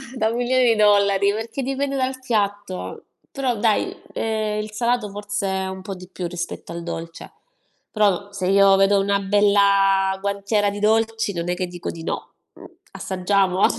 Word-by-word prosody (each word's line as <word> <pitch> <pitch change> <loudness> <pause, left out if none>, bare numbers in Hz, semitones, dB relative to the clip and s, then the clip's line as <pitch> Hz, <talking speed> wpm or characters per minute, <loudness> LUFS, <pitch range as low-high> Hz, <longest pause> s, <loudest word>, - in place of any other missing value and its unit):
da 220 -3 +1
milioni 245 +2 +1
di 230 -2 +4
dollari, 200 -1 +4
perché 230 +5 -4
dipende 275 +1 -2
dal 260 0 -1
piatto. 205 -6 -3 0.3
Però 260 -4 -1
dai, 215 0 +1 0.2
ehm, 215 -1 -1
il 215 0 -7
salato 235 -1 0
forse 205 0 -4
è 190 0 -1
un 190 0 -6
po' 195 0 -6
di 180 0 -11
più 180 -1 -5
rispetto 175 0 -6
al 170 0 -6
dolce. 165 -1 -7 0.6
Però 205 -2 +1
se 195 -2 -3
io 195 0 +6
vedo 195 +1 +4
una 200 0 +1
bella 195 -1 +3
guantiera 200 +1 0
di 205 0 -5
dolci, 225 0 +1
non 170 0 -3
è 180 - 0
che 185 0 -2
dico 175 -1 -6
di 165 - -7
no, - - -5 0.2
mhmm, - - -14 0.3
assaggiamo? 190 0 +1
200 Hz, 170 wpm, -22 LUFS, 190-220 Hz, 0.6 s, io